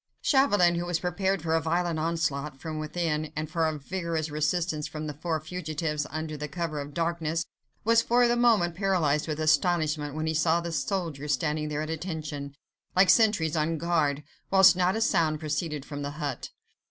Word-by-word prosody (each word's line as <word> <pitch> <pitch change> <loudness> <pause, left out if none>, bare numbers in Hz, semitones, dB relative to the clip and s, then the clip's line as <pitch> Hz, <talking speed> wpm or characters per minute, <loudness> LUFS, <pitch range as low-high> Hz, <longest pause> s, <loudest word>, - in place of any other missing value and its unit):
Chauvelin, 205 - +4
who 175 - -3
was 175 -1 +1
prepared 185 +1 -1
for 160 -1 0
a 165 - +3
violent 170 0 0
onslaught 150 -4 -2
from 155 +1 -5
within, 155 0 -2
and 155 0 -2
for 160 +1 0
a 155 -1 -2
vigorous 165 0 -3
resistance 155 0 -1
from 155 0 -6
the 150 - -4
four 160 +2 -2
fugitives, 155 -2 -3
under 155 0 -4
cover 160 -1 -3
of 140 - -6
the 145 - -14
darkness, 165 -1 -1 0.4
was 230 +1 +4
for 240 +1 +3
the 240 - +2
moment 225 -8 +3
paralyzed 170 -6 +1
with 155 -1 -3
astonishment 155 -2 +1
when 155 0 -2
he 160 - 0
saw 160 +2 +2
the 170 0 -4
soldiers 150 -1 -2
standing 150 +3 -1
there 150 0 -2
at 155 - -4
attention, 155 -4 -5 0.4
like 185 0 +6
sentries 205 -8 +3
on 160 +1 0
guard, 150 -3 0 0.3
whilst 190 -2 +7
not 180 +2 +2
a 225 - -1
sound 165 -8 +2
proceeded 150 -1 -3
from 145 -1 -6
the 140 - -3
hut. 145 -3 -4
160 Hz, 185 wpm, -27 LUFS, 150-175 Hz, 0.4 s, whilst